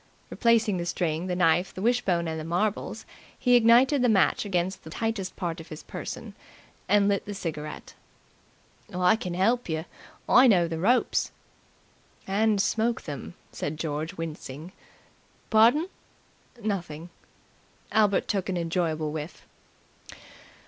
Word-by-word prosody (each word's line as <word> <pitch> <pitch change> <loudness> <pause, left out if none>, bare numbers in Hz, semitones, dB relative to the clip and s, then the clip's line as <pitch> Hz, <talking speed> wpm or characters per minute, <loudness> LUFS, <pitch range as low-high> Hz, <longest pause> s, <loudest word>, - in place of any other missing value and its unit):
Replacing 230 -4 +2
the 170 - -3
string, 170 0 -1
the 180 - -1
knife, 175 +1 +2
the 185 - -6
wishbone 195 -8 +1
and 160 0 -3
the - - -5
marbles, 180 +6 -2 0.3
he 245 - +2
ignited 245 +4 +5
the 245 - +3
match 205 0 +3
against 185 -1 -1
the 160 - -10
tightest 210 0 -3
part 170 -2 -3
of 160 - -10
his 155 0 -9
person - - -7 0.6
and 205 -1 +4
lit 200 -1 0
the 205 - -5
cigarette. 155 -5 -6 1.0
"I 180 +3 +3
can 180 -5 -5
help 230 +4 +1
yer. 160 0 -2 0.4
I 255 +2 +7
know 180 -7 +4
the 165 -1 -4
ropes." 240 +8 +2 1.0
"And 210 +2 +2
smoke 225 +3 0
them," 145 +3 -7 0.2
said 150 - -4
George, 155 0 -3
wincing. 160 0 -7 0.8
"Pardon?" 235 +10 +5 0.8
"Nothing." 175 -5 -4 0.8
Albert 210 -3 +3
took 195 -2 -1
an 185 - -1
enjoyable 165 -3 -1
whiff. 155 +1 -7
185 Hz, 135 wpm, -27 LUFS, 165-220 Hz, 1.0 s, I